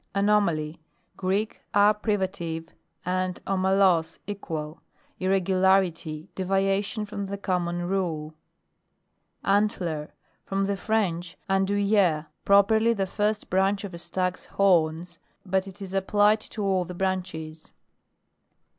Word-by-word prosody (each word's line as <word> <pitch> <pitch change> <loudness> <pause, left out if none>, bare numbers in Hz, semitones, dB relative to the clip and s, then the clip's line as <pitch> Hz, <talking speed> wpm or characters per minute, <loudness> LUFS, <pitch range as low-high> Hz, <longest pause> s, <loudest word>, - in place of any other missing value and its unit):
ANOMALY. 175 -7 +1 0.3
Greek, 195 +3 -1
a 205 +1 +6
privative, 190 -6 -2 0.4
and 185 0 -1
omalos, 190 -3 +2
equal. 165 -6 -5 0.4
Irregularity, 185 -4 +1
devia 195 +1 +1
tion 210 +1 -4
from 200 -1 -5
the 200 +1 -4
common 175 -3 -1
rule. 165 -5 -2 1.1
ANTLER. 180 -7 0 0.3
From 195 0 -1
the 200 0 0
French, 180 -4 -1
andouil 195 +1 +1
ler, 175 -8 +3 0.2
properly 220 +3 +5
the 195 -3 -1
first 210 +2 -1
branch 195 +2 +2
of 195 -3 -6
a 170 - -7
stag's 180 +1 -2
horns; 170 -3 +1 0.3
but 190 0 0
it 195 +1 -9
is 190 -1 -7
applied 205 +2 +3
to 215 0 -5
all 190 -2 +2
the 180 +1 -8
branches. 175 -4 -3
190 Hz, 115 wpm, -26 LUFS, 175-200 Hz, 1.1 s, a